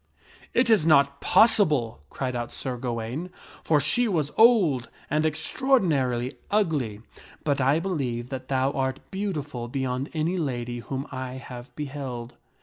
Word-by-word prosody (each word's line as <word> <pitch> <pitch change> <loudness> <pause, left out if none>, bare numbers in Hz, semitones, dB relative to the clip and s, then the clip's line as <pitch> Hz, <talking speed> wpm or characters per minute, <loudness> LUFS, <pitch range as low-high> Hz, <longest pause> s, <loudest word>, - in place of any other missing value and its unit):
" - - -24
It 245 -2 +4
is 210 -8 +5
not 140 -3 +4
possible," 150 - +4
criecTbut 125 -3 -3
Sir 130 -2 -4
Ga 120 0 -3
waine, 120 +10 -4 0.2
" - - -20
for 155 -2 +3
she 235 - +2
was 155 -8 0
old 190 - +5 0.2
and 155 +1 +2
extraordinarily 150 - +1
ugly, 150 - 0 0.4
but 140 -2 +1
I 135 +4 +3
believe 130 -10 -2
that 130 -1 -6
thou 135 0 +1
art 130 -1 -1
beautiful 150 -11 -3
beyond 130 +1 -2
any 165 +4 0
lady 120 -5 -3
whom 135 +4 -4
I 130 -1 -5
have 125 -1 -9
beheld." 135 -5 -5
135 Hz, 145 wpm, -26 LUFS, 125-160 Hz, 0.4 s, is